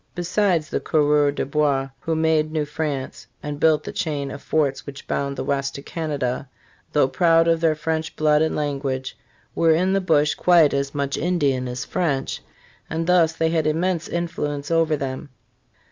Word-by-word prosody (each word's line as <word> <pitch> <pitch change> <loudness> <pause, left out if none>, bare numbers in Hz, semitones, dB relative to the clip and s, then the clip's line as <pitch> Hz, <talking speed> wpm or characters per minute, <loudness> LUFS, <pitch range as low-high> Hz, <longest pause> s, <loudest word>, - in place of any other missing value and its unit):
* - - -41
Besides, 175 -2 0
the - - 0
conreurs 145 -1 +2
des - - -1
bois, 140 -1 0
who 165 - -2
made 160 -1 +1
New 155 -1 -1
France 150 -3 -4 0.2
and 145 -1 -5
built 155 -1 +3
the - - -6
chain 145 -4 -3
of 140 - -8
forts 150 -3 -1
which 140 -1 -9
bound 140 0 -2
the - - -2
West 140 0 -1
to 140 - -7
Canada, 140 -6 -3 0.4
though 145 -3 +4
proud 165 +2 +3
of 165 -1 +2
their 160 -2 +3
French 160 +1 -3
blood 150 -1 +3
and 160 - +1
language, 135 -3 -3 0.4
were 165 -1 +3
in 185 +3 +1
the 195 - +2
bush 150 -4 +2
quite 170 -4 +4
as 140 0 -2
much 140 -1 -1
Indian 140 -7 0
as 125 +1 -4
French, 140 -6 -2 0.5
and 165 +1 -2
thus 170 -2 +3
they 160 0 0
had 160 -2 +1
immense 170 +2 0
influence 150 -4 -3
over 165 -2 +2
them. 135 +1 -5
150 Hz, 180 wpm, -22 LUFS, 140-165 Hz, 0.5 s, though